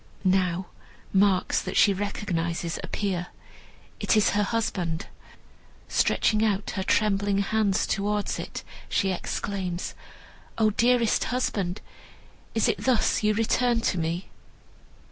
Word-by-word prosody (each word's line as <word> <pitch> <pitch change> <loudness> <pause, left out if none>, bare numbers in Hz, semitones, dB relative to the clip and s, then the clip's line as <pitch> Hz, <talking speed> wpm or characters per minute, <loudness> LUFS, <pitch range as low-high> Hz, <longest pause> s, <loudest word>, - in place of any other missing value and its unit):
Now 185 -1 +2 0.5
marks 190 -1 +3
that 185 - -4
she 200 - +6
recognizes 170 -4 -2
appear. 185 -4 -2 0.7
It - - +2
is 210 - +4
her 205 - +2
husband! 190 -7 -1 0.8
Stretching 215 0 +2
out 205 -2 0
her 190 - -3
trembling 200 0 +2
hands 200 -1 +1
towards 205 +1 -1
it, - - -6 0.3
she 195 - +1
exclaims, 185 -1 -3 0.6
"O 220 -1 +3
dearest 235 +1 +3
husband, 200 -7 -1 0.7
is - - +3
it - - 0
thus 255 -4 +2
you 210 -1 +2
return 235 +2 +2
to 185 -5 0
me?" 170 +3 -2
200 Hz, 115 wpm, -26 LUFS, 185-215 Hz, 0.8 s, she